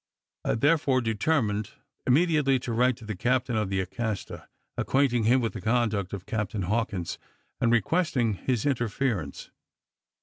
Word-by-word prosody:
I -, -, +1 dB
therefore 140 Hz, 0 st, +3 dB
determined 110 Hz, -2 st, 0 dB, 0.3 s
immediately 150 Hz, -1 st, +3 dB
to 120 Hz, -, -3 dB
write 125 Hz, +1 st, +2 dB
to 115 Hz, -, -12 dB
the 110 Hz, -1 st, -4 dB
captain 125 Hz, +4 st, 0 dB
of 105 Hz, -3 st, 0 dB
the 95 Hz, -1 st, 0 dB
Acasta, 105 Hz, +2 st, -4 dB, 0.3 s
acquainting 130 Hz, -4 st, +1 dB
him 125 Hz, +3 st, +4 dB
with 115 Hz, -, -1 dB
the -, -, -6 dB
conduct 110 Hz, -4 st, 0 dB
of 100 Hz, -2 st, -6 dB
Captain 105 Hz, -2 st, -2 dB
Hawkins, 100 Hz, -3 st, -2 dB, 0.4 s
and 115 Hz, -, +2 dB
requesting 120 Hz, -, +2 dB
his 115 Hz, +3 st, -1 dB
interference. 120 Hz, -, -1 dB
115 Hz, 140 wpm, -27 LUFS, 105-130 Hz, 0.4 s, him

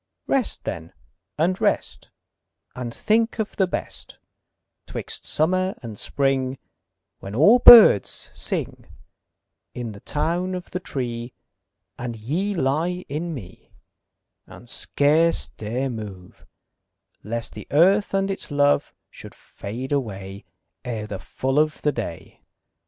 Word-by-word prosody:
Rest 265 Hz, -5 st, 0 dB
then 85 Hz, 0 st, -6 dB, 0.4 s
and 180 Hz, +4 st, +1 dB
rest, -, -, -1 dB, 0.6 s
And 125 Hz, -2 st, -5 dB
think 225 Hz, -, +1 dB
of 220 Hz, -2 st, -3 dB
the 190 Hz, -, +3 dB
best -, -, -6 dB, 0.7 s
'Twixt -, -, -5 dB
summer 185 Hz, +4 st, +1 dB
and 115 Hz, -3 st, -7 dB
spring, 135 Hz, -1 st, 0 dB, 0.6 s
When 100 Hz, +2 st, -8 dB
all 205 Hz, -, +6 dB
birds 225 Hz, -, +8 dB
sing -, -, -3 dB, 0.9 s
In 120 Hz, -2 st, -4 dB
the 100 Hz, -, -11 dB
town 175 Hz, -, -1 dB
of 180 Hz, -, -8 dB
the 180 Hz, -, -3 dB
tree, 120 Hz, -7 st, -4 dB, 0.7 s
And 120 Hz, -1 st, -4 dB
ye 165 Hz, -, -2 dB
lie 170 Hz, +5 st, -1 dB
in 160 Hz, +3 st, -3 dB
me 95 Hz, -8 st, -12 dB, 0.7 s
And 120 Hz, -, -14 dB
scarce 155 Hz, +6 st, +2 dB
dare 120 Hz, +5 st, -3 dB
move, 100 Hz, -5 st, -9 dB, 0.8 s
Lest 115 Hz, +2 st, -3 dB
the -, -, -9 dB
earth 190 Hz, +7 st, +4 dB
and 195 Hz, 0 st, +1 dB
its 195 Hz, -, -4 dB
love 145 Hz, -1 st, +2 dB, 0.2 s
Should -, -, -12 dB
fade 120 Hz, +7 st, -8 dB
away 100 Hz, -8 st, -4 dB, 0.4 s
Ere 115 Hz, -3 st, -4 dB
the 100 Hz, -3 st, -6 dB
full 135 Hz, +2 st, -1 dB
of 155 Hz, 0 st, +1 dB
the 150 Hz, -, +3 dB
day. 110 Hz, -10 st, -7 dB
140 Hz, 125 wpm, -23 LUFS, 115-180 Hz, 0.9 s, birds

